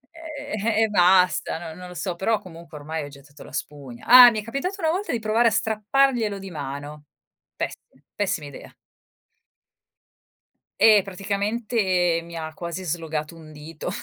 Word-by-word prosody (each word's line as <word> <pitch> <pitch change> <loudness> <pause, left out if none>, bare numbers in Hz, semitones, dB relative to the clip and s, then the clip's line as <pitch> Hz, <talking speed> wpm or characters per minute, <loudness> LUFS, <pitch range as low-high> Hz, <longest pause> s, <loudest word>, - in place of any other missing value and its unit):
Ehm, 290 -9 -6 0.2
e 220 - +3
basta, 180 -3 +3
no 165 -1 -8
non 180 - -9
lo 180 - -10
so, 180 -2 -3
però 215 +4 0
comunque 165 -3 -12
ormai 155 +1 -5
ho - - -7
gettato 145 +1 -15
la - - -13
spugna. 135 -5 -7
Ah, 250 0 +11
mi 215 - -3
è - - -14
capitato 275 - -3
una 320 -3 +1
volta 380 +5 -2
di 240 - -1
provare 220 +2 +2
a 230 - +3
strapparglielo 220 +1 +1
di 195 -1 -9
mano. 145 0 -7 0.5
Pessi - - -4 0.4
pessima 180 -7 -2
idea. 140 - -12 2.1
Eh, 215 -3 +7
praticamente 200 -2 -1
mi 170 0 -11
ha 160 -1 -6
quasi 170 +1 -6
slogato 160 -2 -4
un 155 -2 -13
dito. 155 +3 -8
185 Hz, 160 wpm, -24 LUFS, 160-220 Hz, 2.1 s, Ah